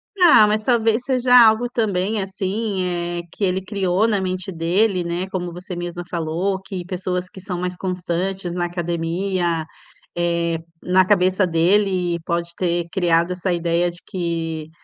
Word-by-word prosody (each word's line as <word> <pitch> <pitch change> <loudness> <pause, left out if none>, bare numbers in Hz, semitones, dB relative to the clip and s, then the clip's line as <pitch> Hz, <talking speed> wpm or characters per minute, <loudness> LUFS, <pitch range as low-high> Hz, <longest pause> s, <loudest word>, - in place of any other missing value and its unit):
Ah, 345 - +7
mas 215 +1 0
talvez 230 -1 +2
seja 250 -1 +3
algo 235 0 +6
também, 210 -2 0
assim, 195 +1 -2 0.4
eh, - - -3
que - - -6
ele 190 0 +1
criou 195 +1 +1
na 210 -3 +1
mente 185 0 -3
dele, 180 +3 +1
né, 175 +2 -3
como 180 -2 -4
você 180 +1 -7
mesma 175 0 -5
falou, 175 +3 -1
que 190 -2 -6
pessoas 180 0 -3
que 190 - -12
são 180 -1 -5
mais 180 0 -3
constantes 180 0 -2
na 175 0 -1
academia, 175 0 -1 0.5
eh, 170 -1 0 0.3
na 185 +1 +4
cabeça 185 0 +3
dele 180 +1 +2
e - - -4
pode 170 +1 -2
ter 175 -2 -1
criado 170 -2 +2
essa 180 0 -1
ideia 170 0 +1
de 175 - -6
que 165 -3 -3
180 Hz, 160 wpm, -21 LUFS, 170-195 Hz, 0.5 s, Ah